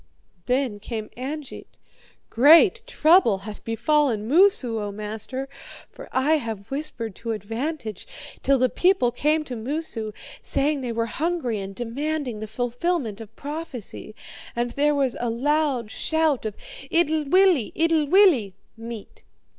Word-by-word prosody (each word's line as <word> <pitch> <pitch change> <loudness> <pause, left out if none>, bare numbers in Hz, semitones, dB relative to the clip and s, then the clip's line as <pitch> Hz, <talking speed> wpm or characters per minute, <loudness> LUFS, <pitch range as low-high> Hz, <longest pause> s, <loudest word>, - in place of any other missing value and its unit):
"Then 250 -4 0
came 215 0 -6
Angeit: 275 +3 -7 0.5
'Great 330 - +6
trouble 320 - +4
hath 215 -1 -8
befallen 230 -1 +1
Moosu, 285 - +3
O 205 -1 -4
master, 215 +6 -5 0.4
for - - -11
I 290 +5 +3
have 225 -6 -6
whispered 260 -7 -3
to 230 -1 -3
advantage, 225 - -5 0.3
till 275 0 +3
the 255 0 +3
people 355 -4 +2
came 300 +5 +1
to 260 -4 -6
Moosu, 230 -2 -4 0.3
saying 285 0 0
they 245 -2 -3
were 230 0 -1
hungry 280 -3 -2
and 195 0 -7
demanding 260 +1 -3
the 215 - -5
fulfilment 245 - -2
of 225 0 -12
prophecy. 285 -8 -7 0.4
And 240 0 -1
there 295 +2 +2
was 270 -4 +1
a 240 - -1
loud 265 -1 0
shout 315 -7 +1
of 210 - -6 0.3
"Itlwillie! 320 - +3
Itlwillie!" 320 - +4 0.2
(Meat.) 230 -2 -9
255 Hz, 130 wpm, -24 LUFS, 225-310 Hz, 0.5 s, Great